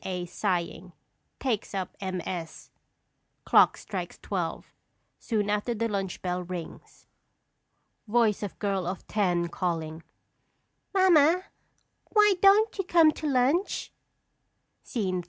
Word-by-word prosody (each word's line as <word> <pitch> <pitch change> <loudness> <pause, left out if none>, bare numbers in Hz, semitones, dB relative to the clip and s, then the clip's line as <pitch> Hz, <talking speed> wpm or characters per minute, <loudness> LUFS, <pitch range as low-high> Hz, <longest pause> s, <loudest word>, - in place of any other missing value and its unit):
A., 180 -2 -3
sighing, 175 -1 -3 0.5
takes 225 -6 -2
up 190 -2 -4
MS. 180 -3 -5 0.7
Clock - - +5
strikes - - -6
twelve; - - -4 0.5
soon 210 -3 -1
after 210 +3 -1
the 230 +1 0
lunch 195 -4 -4
bell 180 0 -1
rings._] 180 -2 -8 1.0
Voice 220 -2 +2
of 205 -3 -5
Girl 195 -4 -1
of 185 +1 -5
Ten, 180 -5 0
calling: 165 -2 -3 0.9
Mamma, 360 -3 +5 0.7
why 420 -2 +5
don't 410 +2 +5
you - - +1
come 335 -3 +5
to 305 - -5
lunch? 280 +8 +1 0.9
SCENE 195 -7 -2
III. - - -1
205 Hz, 115 wpm, -27 LUFS, 180-280 Hz, 1.0 s, Clock